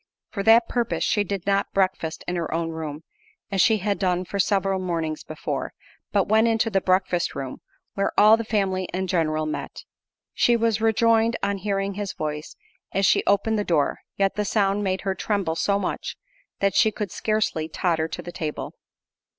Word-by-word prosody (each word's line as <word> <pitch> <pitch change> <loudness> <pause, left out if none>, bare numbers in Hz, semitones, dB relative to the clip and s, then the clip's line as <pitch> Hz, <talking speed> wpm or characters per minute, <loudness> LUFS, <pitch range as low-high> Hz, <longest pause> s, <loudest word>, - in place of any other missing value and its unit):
For 200 - -3
that 225 +3 +6
purpose 240 -2 -1
she 205 - +2
did 200 -2 -4
not 200 0 0
breakfast 185 -4 0
in 180 - -1
her 170 -2 -3
own 165 0 -1
room, 155 -1 -6 0.5
as 195 -2 +2
she 220 -2 +4
had 200 0 -1
done 180 -1 0
for 200 - -4
several 195 -1 +1
mornings 165 -4 -2
before, 155 - -4 0.4
but 200 -2 +2
went 220 +2 +4
into 225 0 +1
the 195 -2 +2
breakfast 185 -1 +1
room, 135 -2 -6 0.3
where 195 - 0
all 215 +1 +8
the 230 - -3
family 195 -4 0
in 190 +1 -1
general 155 -4 0
met. 155 - -5 0.5
She 240 -1 +3
was 225 -2 +1
rejoiced 225 +1 +3
on 200 0 0
hearing 195 0 -1
his 205 0 -4
voice 150 0 -5 0.4
as 195 0 +1
she - - +4
opened 210 +2 +2
the - - 0
door, 160 -7 +1 0.2
yet 195 -1 +2
the 210 - +1
sound 200 0 +1
made 190 -1 -1
her 195 -1 -1
tremble 195 -3 -1
so 200 +4 +1
much, 200 - -4 0.4
that 195 -1 +2
she 220 - +4
could 210 -3 -4
scarcely 215 -7 -1
totter 160 -1 0
to - - -6
the 175 - -7
table. 155 -4 -5
195 Hz, 185 wpm, -24 LUFS, 170-210 Hz, 0.5 s, all